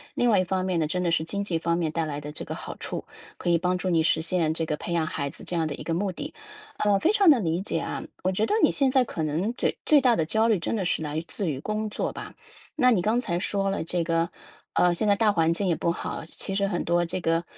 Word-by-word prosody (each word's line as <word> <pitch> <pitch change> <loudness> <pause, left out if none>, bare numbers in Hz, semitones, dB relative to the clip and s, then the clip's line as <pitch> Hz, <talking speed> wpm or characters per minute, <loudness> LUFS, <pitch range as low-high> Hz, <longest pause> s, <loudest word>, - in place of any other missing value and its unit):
另 245 - +2
外 205 -4 +5
一 185 - +1
方 185 0 -1
面 185 -2 0
呢， 155 - +1
真 180 +3 -1
的 170 - +1
是 160 -1 +1
经 200 +4 -3
济 170 -5 -1
方 170 +1 0
面 165 -3 -1
带 165 0 -1
来 145 -1 -4
的 150 +1 -6
这 - - -5
个 - - -5
好 - - -7
处， - - -5 0.3
可 - - -2
以 170 - +5
帮 180 +2 0
助 185 +1 -2
你 165 -2 +3
实 160 0 +2
现 165 -1 +1
这 165 0 -1
个 150 -1 -2
培 170 - -4
养 165 -2 +1
孩 140 -2 -3
子 - - -11
这 180 - -4
样 160 -1 +1
的 145 - -4
一 - - -8
个 165 - -2
目 190 +3 0
的， 290 - -6 0.4
呃， 205 -1 +3
非 345 - +3
常 405 -4 +5
能 255 -9 +5
理 165 +2 0
解 180 -4 -1
啊。 - - -4 0.2
我 185 - +2
觉 210 +4 +1
得， 420 - +1
你 - - +6
现 275 -2 +2
在 260 0 +4
可 200 -8 -5
能 165 +9 -1
嘴 - - -1
最 300 - +6
大 245 -3 +4
的 160 - +1
焦 220 +7 +2
虑 220 -3 +3
真 175 - -2
的 190 - -1
是 165 - 0
来 155 +2 -3
自 195 -5 -2
于 135 -3 -3
工 215 +6 -2
作 - - -3
吧， - - -8 0.4
那 250 -5 +4
你 205 -7 +3
刚 220 +6 +2
才 175 -8 -1
说 195 +1 -1
了 195 - -1
这 170 +1 -1
个 165 0 +1 0.4
呃， 180 -1 +4
现 210 +5 0
在 205 - +5
大 215 0 +3
环 165 -3 +2
境 195 +3 -1
也 170 - +2
不 170 - 0
好， 170 - -5
其 195 - -4
实 200 +1 +1
很 185 -3 -1
多 175 0 +2
这 170 +2 -3
个， 165 0 +1
180 Hz, 320 characters per minute, -26 LUFS, 165-205 Hz, 0.4 s, 你